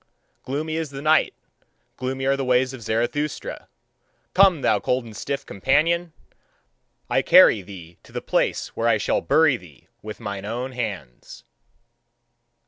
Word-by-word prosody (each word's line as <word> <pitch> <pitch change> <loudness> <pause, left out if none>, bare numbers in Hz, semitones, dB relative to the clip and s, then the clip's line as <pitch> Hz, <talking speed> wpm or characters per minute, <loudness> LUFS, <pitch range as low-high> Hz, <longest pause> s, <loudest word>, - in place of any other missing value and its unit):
Gloomy 155 +4 -3
is 160 -2 -3
the 135 0 -8
night, 155 +2 +2 0.6
gloomy 130 +1 -4
are 135 +1 +3
the 135 - -3
ways 125 0 +2
of 130 - -9
Zarathustra. 120 +7 -3 0.7
Come, 185 -5 +4
thou 105 - +3
cold 125 +2 -1
and 110 -2 -11
stiff 140 +3 -4
companion! 165 - +1 1.0
I - - +2
carry 105 - +6
thee 90 -3 -12
to - - -19
the - - -4
place - - -1
where - - -2
I - - +4
shall - - 0
bury 140 - +3
thee 80 - -18
with 105 -1 -8
mine 100 -3 -5
own 120 +5 -4
hands. 100 - -7
130 Hz, 145 wpm, -23 LUFS, 105-145 Hz, 1.0 s, carry